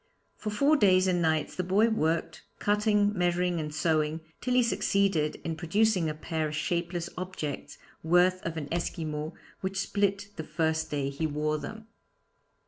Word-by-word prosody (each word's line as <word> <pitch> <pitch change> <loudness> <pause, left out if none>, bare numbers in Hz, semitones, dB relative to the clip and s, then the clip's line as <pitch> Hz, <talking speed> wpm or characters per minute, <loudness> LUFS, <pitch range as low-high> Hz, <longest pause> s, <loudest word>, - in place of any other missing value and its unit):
For 215 - -5
four 280 +9 +3
days 185 -5 +5
and 180 -2 +2
nights 160 -2 +1
the 185 - -1
boy 200 +5 +3
worked, 165 -5 0 0.2
cutting, 210 0 +2
measuring 175 -1 +1
and 150 -1 -3
sewing, 155 0 0 0.2
till 250 -1 0
he 250 - +5
succeeded 195 -8 +1
in 165 - -2
producing 180 +1 +2
a 155 - -4
pair 155 0 -2
of 150 - -5
shapeless 170 +2 -1
objects, 180 -6 -5 0.2
worthy 180 +3 +4
of 165 -1 -4
an 145 -3 -4
Esquimaux, 155 -2 -3 0.2
which 190 0 -3
split 200 0 0
the 160 - -3
first 160 0 -1
day 140 -2 -1
he 155 +3 -1
wore 150 0 -1
them. 220 +7 -8
170 Hz, 160 wpm, -29 LUFS, 155-200 Hz, 0.2 s, days